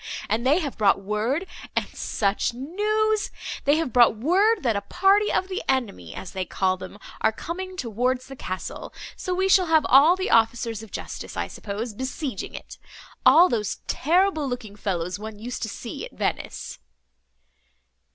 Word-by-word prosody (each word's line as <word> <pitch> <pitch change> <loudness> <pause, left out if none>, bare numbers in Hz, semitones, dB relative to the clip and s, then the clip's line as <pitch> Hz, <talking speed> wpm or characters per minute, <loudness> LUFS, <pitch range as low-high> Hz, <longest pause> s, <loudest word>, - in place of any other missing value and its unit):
And 225 +2 +1
they 290 +4 +5
have 295 -9 -3
brought 200 -2 +4
word—and 225 - -2
such 205 +3 -1
news! 420 - 0 0.4
they 285 - +5
have 315 -6 -1
brought 240 -3 +6
word, 380 - +3
that 235 -4 +2
a 200 - 0
party 390 - +3
of 375 - +1
the 380 +1 -3
enemy, 225 - -1
as 190 - -7
they 190 -1 -2
call 185 0 0
them, 185 - -9 0.2
are 220 - +4
coming 370 +10 -6
towards 250 - -1
the 270 - -10
castle; 185 -6 -6 0.2
so 365 - -3
we 380 +1 +2
shall 375 -2 +5
have 320 -2 +4
all 290 +7 +7
the 375 0 -2
officers 225 -1 +2
of 220 - -11
justice, - - -6
I - - -1
suppose, 215 +3 -5
besieging 260 +4 -4
it! - - -10 0.5
all 350 +3 +8
those 215 - -1
terrible 325 -2 +2
looking 240 -5 -5
fellows 180 -3 -2
one 215 0 -7
used 240 +4 -6
to 220 - -2
see - - -7
at - - -8
Venice." - - -3
255 Hz, 165 wpm, -25 LUFS, 215-355 Hz, 0.5 s, all